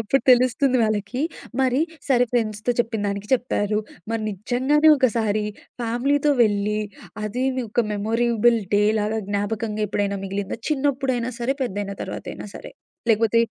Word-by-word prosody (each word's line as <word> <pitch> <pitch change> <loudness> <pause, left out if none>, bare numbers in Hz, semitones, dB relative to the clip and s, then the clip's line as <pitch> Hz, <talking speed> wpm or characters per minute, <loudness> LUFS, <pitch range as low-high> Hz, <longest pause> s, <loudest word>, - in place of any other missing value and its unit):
అప్పుడు 225 +5 +1
తెలుస్తుంది 255 +1 +4
వాళ్ళకి. 215 +2 -1 0.4
మరి 260 +1 +2 0.3
సరే 245 -2 +4
ఫ్రెండ్స్‌తో 215 -1 0
చెప్పినదానికి 210 -3 -1
చెప్పారు. 215 -4 0 0.3
మరి 225 -1 -1
నిజంగానే 255 +10 +2
ఒకసారి 220 -5 +1 0.4
ఫ్యామిలీతో 275 +5 +1
వెళ్లి, 210 -1 +1 0.5
అది‌నుక 245 0 -1
మెమరబుల్ 230 +2 +2 0.2
డే‌లాగా 210 +1 +2
జ్ఞాపకంగా 210 +1 -2
ఎప్పుడైనా 200 0 -1
మిగిలిందా? 195 +1 -3
చిన్నప్పుడైనా 265 -4 0
సరే, 250 +3 0
పెద్దైన 200 -4 -3
తర్వాతయినా - - -6
సరే. - - -9 0.4
లేకపోతే 225 +1 +3
225 Hz, 110 wpm, -23 LUFS, 210-250 Hz, 0.5 s, తెలుస్తుంది